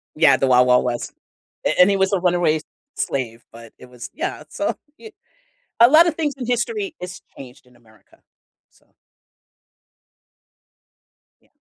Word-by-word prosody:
Yeah, 160 - +4
the 135 - 0
Wild 125 0 +4
Wild 125 0 +4
West. 120 -1 -4 0.5
A - - 0
and 180 +2 +7
he 200 - +1
was 190 0 0
a 195 - +2
runaway 175 -3 +1 0.4
slave, 120 -3 -4
but 115 -1 -14
it - - -14
was 125 -1 -10
yeah, 350 +4 -5
so - - -3 0.2
y 445 - -13 0.7
a 235 - +8
lotta 325 +4 +5
things 305 -3 -3
in 255 -3 -6
history 380 - -2
has 180 0 -8 0.2
changed 125 -1 -13
in 125 -1 -24
America, 110 -2 -25 0.5
so - - -31 2.6
Yeah. - - -34
175 Hz, 150 wpm, -20 LUFS, -, 2.6 s, a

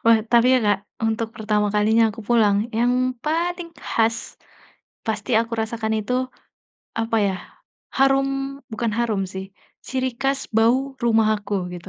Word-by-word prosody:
Wah, 230 -1 +6
tapi 235 0 +5
ya, - - +5
Kak, 205 -1 +3 0.3
untuk 225 0 -1
pertama 210 -2 +1
kalinya, 220 +2 +4
aku 225 - -10
pulang 215 -4 +4 0.2
yang 245 +1 +3 0.3
paling 340 +2 -1
khas, 225 -2 -1 0.7
pasti 215 -2 -3
aku 230 0 -3
rasakan 220 0 -2
itu, 215 +4 -3 0.9
apa 225 0 0
ya, 190 - 0 0.6
harum 270 0 +4 0.5
bukan 225 0 -1
harum 220 -4 0
sih, 190 0 -5 0.4
ciri 260 0 0
khas 270 0 -1
bau 260 +4 +2
rumah 225 -2 +4
aku, 205 0 -5 0.2
gitu. 175 - -9
230 Hz, 140 wpm, -22 LUFS, 215-255 Hz, 0.9 s, Wah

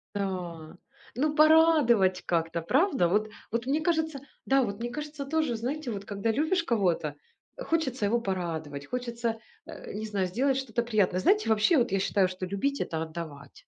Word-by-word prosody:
Да. 180 -4 -4 0.4
Ну 300 +4 0
порадовать 300 - +5
как-то, 165 0 0
правда? 270 - +2
Вот, 210 +5 +1 0.2
вот 230 +2 -1
мне 295 +4 +1
кажется, 320 -3 0 0.3
да, 270 0 +3
вот 205 -3 -4
мне 240 +1 -3
кажется 300 +2 -6
тоже, 305 -4 0
знаете, 255 +4 -3
вот 200 -2 -5
когда 205 +2 -1
любишь 320 - +1
кого-то, 180 - 0 0.4
хочется 275 - -1
его 235 +4 +2
порадовать, 160 -7 -4
хочется, 235 -2 -3 0.3
а, - - -9
не 215 +2 -5
знаю, 195 -3 -1
сделать 260 +8 +1
что-то 240 -3 -2
приятное. 205 -6 +1
Знаете, 410 - +3
вообще 220 +9 +4
вот 245 0 +2
я 195 - +1
считаю, 195 -1 +2
что 185 0 -5
любить 200 +10 -1
это 160 -1 -2
отдавать. 160 -4 -8
225 Hz, 165 wpm, -28 LUFS, 185-280 Hz, 0.4 s, порадовать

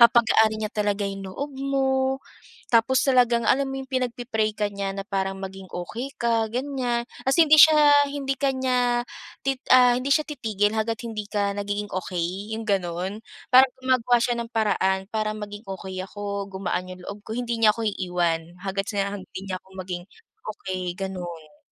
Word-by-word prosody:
papagaanin 220 -2 +5
niya 210 - -4
talaga 205 -1 0
'yong 195 -1 -5
loob 285 +9 -5
mo. 265 -1 0 0.5
Tapos 240 +3 +4
talagang, 245 -3 +3
alam 275 +1 +3
mo 270 0 -4
'yong 265 - -9
pinagpe-pray 245 -4 -1
ka 210 -1 0
niya 200 -1 -3
na 195 - -4
parang 195 -1 -2
maging 190 -1 -8
okey 230 +10 -5
ka, 230 -2 +2
ganiyan, 250 -2 -1 0.2
tas 265 +4 +2
hindi 310 -2 +7
siya 300 -2 +8 0.2
hindi 280 -1 -2
ka 275 +1 +1
niya, 250 -2 +1 0.4
tit 270 -1 0
ah, 250 -1 +7
hindi 255 +2 -2
siya 305 +1 +3
titigil 215 -7 0
hangga't 225 +1 -1
hindi 220 -2 -4
ka 205 -1 0
nagiging 205 0 -3
okey, 185 +3 -3
'yong 225 - -5
gano'n. 185 +1 -1 0.3
Parang 255 0 +6
gumagawa 255 -2 +3
siya 240 - +1
ng 235 0 -5
paraan 195 -4 +1
para 215 -1 -1
maging 210 +1 -7
okey 190 -1 -7
ako, 200 0 -4
gumaan 185 -1 -3
'yong 185 0 -11
loob 205 - -6
ko, 220 - -6
hindi 235 0 -2
niya 220 -2 +5
ako 225 -1 -2
iiwan 175 -4 0 0.2
hangga't 195 +1 -3
sa 200 0 -1
hindi 190 -1 -9
niya 185 - -2
ako 190 - -26
maging 180 -1 -5 0.5
okey, 185 -3 -4
gano'n. 175 -5 -6
215 Hz, 175 wpm, -25 LUFS, 195-250 Hz, 0.5 s, siya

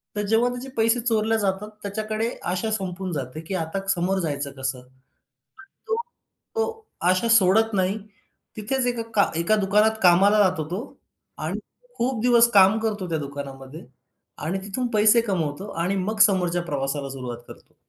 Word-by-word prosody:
तर 210 - -1
जेव्हा 225 +3 +3
त्याचे 245 +2 -6
पैसे 230 +2 +3
चोरले 225 -1 +1
जातात, 200 +1 -1
त्याच्याकडे 215 +2 -2 0.2
आशा 185 +5 -2
संपून 190 -3 -3
जाते, 135 0 -5
की 175 +4 -5
आता 165 +2 -2
समोर 190 +1 +1
जायचं 145 -5 -3
कसं? 130 -1 -3
पण 125 - -22 1.0
तो 450 - +1 0.6
तो 450 -1 -2 0.2
आशा 185 +5 +1
सोडत 215 +3 +3
नाही. 190 +2 +1 0.6
तिथेच 250 +4 -1
एका 240 -2 -1
का 200 - +3
एका 215 +6 +2
दुकानात 210 +2 +2
कामाला 195 +4 +5
जातो 185 -4 0
तो 185 +5 -2 0.6
आणि - - -2 0.4
खूप 245 -1 0
दिवस 235 -1 +5
काम 195 +2 +6
करतो 210 -4 -2
त्या 160 - 0
दुकानामध्ये 140 +1 -8 0.6
आणि 185 +4 -1
तिथून 245 +5 -2
पैसे 215 +2 +5
कमवतो 190 -3 -2
आणि 190 +3 0
मग 215 0 -3
समोरच्या 180 -3 0
प्रवासाला 140 -3 -3
सुरुवात 125 -3 -6
करतो. - - -15
195 Hz, 155 wpm, -24 LUFS, 170-220 Hz, 1.0 s, काम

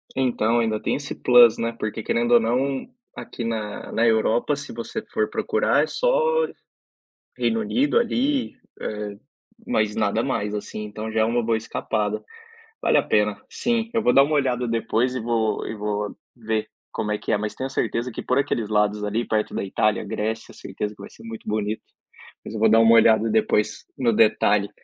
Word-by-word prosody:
Então, 120 -3 +1
ainda 110 -2 0
tem - - 0
esse 145 0 -5
plus, 120 -2 +6
né? 115 0 -2
Porque 110 0 -3
querendo 120 +1 0
ou 120 - +8
não, 130 +4 0 0.3
aqui 120 - -7
na 110 -2 -4
na 115 - +2
Europa, 115 +5 +2
se 140 -2 -8
você 115 0 -5
for 110 - +1
procurar, 445 +3 +1
é - - -2
só 485 -1 +2 0.9
Reino 225 - +1
Unido 260 - +1
ali, 275 - 0 0.3
eh, 105 -1 -5 0.5
mas 105 -1 +1
nada 110 +1 +1
mais 105 -6 -2
assim. 105 +1 -5
Então 110 +1 -6
já 110 0 +1
é - - +4
uma 120 +1 0
boa 115 0 +1
escapada. 110 -1 -2 0.6
Vale - - +4
a - - +3
pena 105 -1 +1
sim, 230 -1 -1
eu 225 - +2
vou 125 - +4
dar 135 - +8
uma 150 +1 -1
olhada 125 -3 0
depois 115 +2 0
e 130 - -2
vou 115 -1 -1
e - - -5
vou 105 0 -3 0.2
ver 110 -2 -2 0.2
como 105 0 -2
é 105 - -1
que - - -6
é, - - +4
mas 105 0 -4
tenho 130 - -4
a 135 - -6
certeza 120 -1 -1
que - - -5
por 125 - 0
aqueles 120 -6 -1
lados 105 0 +1
ali, 110 +3 -1
perto 110 -1 -1
da - - -2
Itália, 105 +2 +1
Grécia, 110 +1 -4
certeza 105 0 -5
que - - -20
vai - - -10
ser - - -16
muito 115 -1 -8
bonito. 105 0 -2 0.6
Mas - - -8
eu 110 - -4
vou 110 - +4
dar 115 +1 +6
uma 115 0 +6
olhada 110 0 +5
depois, 105 -1 +1
no 125 -4 +2
detalhe. 105 -2 +3
115 Hz, 195 wpm, -23 LUFS, 105-125 Hz, 0.9 s, ou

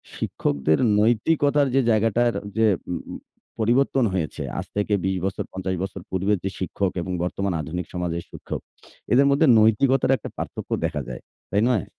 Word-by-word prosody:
শিক্ষকদের 75 +2 0 0.2
নৈতিকতার 140 +6 +3
যে, 135 - +5
জায়গাটার 115 +2 +2 0.2
যে, 110 0 +4 0.2
উ - - 0 0.7
পরিবর্তন 125 +3 +2
হয়েছে 85 -5 -2 0.2
আজ - - -4
থেকে 105 +1 0
২০ 95 0 0
বছর, 95 0 -2
৫০ 95 0 -2
বছর 95 -1 -5
পূর্বের 95 +3 +1
যে, 95 - -1
শিক্ষক 95 +1 -1
এবং 90 - -4
বর্তমান 95 +1 -1
আধুনিক 85 +4 -4
সমাজের 85 -1 -2
শিক্ষক, - - -6 0.5
এদের 135 +3 +6
মধ্যে 145 +3 +4
নৈতিকতার 125 +5 +3
একটা - - -8
পার্থক্য - - -6
দেখা 75 - -2
যায়। 60 - -7 0.3
তাই 100 - +2
নয়? 110 -9 +2
100 Hz, 155 wpm, -24 LUFS, 90-120 Hz, 0.7 s, এদের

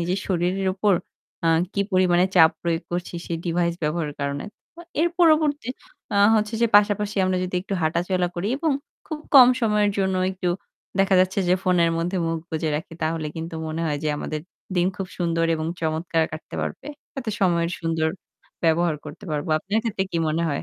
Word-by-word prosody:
নিজের 180 +3 0
শরীরের 185 +1 0
উপর 200 0 +3 0.5
আ - - +3 0.3
কি 200 - +1
পরিমাণে 180 -1 +4
চাপ 160 -2 +8
প্রয়োগ 170 0 0
করছি। 175 0 -3
সেই 170 - -3
ডিভাইস 170 0 +1
ব্যবহারের 150 -1 -1
কারণে। 140 0 -2 0.3
তো 340 - -12 0.2
এর 340 - +4
পরবর্তী 310 -6 +3 0.5
আ - - +2 0.2
হচ্ছে 215 0 +1
যে - - +6
পাশাপাশি 205 0 +2
আমরা 185 0 +1
যদি 185 - -5
একটু 195 +1 -4
হাঁটাচলা 175 +3 +1
করি 175 +4 -2
এবং 315 -1 +1 0.3
খুব 310 - -4 0.2
কম 255 -3 +10
সময়ের 210 -2 +2
জন্য 190 -1 +1 0.2
একটু 185 -1 -3 0.5
দেখা 195 0 +4
যাচ্ছে 185 +1 +1
যে 180 - +5
ফোনের 180 -3 +3
মধ্যে 175 +3 -1
মুখ 165 0 -1
বুজে 160 -1 -1
রাখি 160 +2 -7
তাহলে 160 0 -1
কিন্তু 165 +1 -5
মনে 160 +1 -3
হয় 150 -2 -1
যে - - +1
আমাদের 155 +1 -4 0.4
দিন 175 0 +3
খুব 195 - -3
সুন্দর 165 -2 +1
এবং 155 0 -3
চমৎকার 160 +1 0
কাটতে 155 - -8
পারবে। - - -5 0.3
তাতে 255 -5 -3
সময়ের 170 -3 +2
সুন্দর 165 -1 0 0.6
ব্যবহার 165 0 +3
করতে 150 +2 -10
পারব। 150 +2 -2
আপনার 200 +7 -1
ক্ষেত্রে 210 -4 -1
কি 170 - -1
মনে 160 +2 0
হয়? 145 - -2
175 Hz, 185 wpm, -24 LUFS, 165-195 Hz, 0.6 s, কম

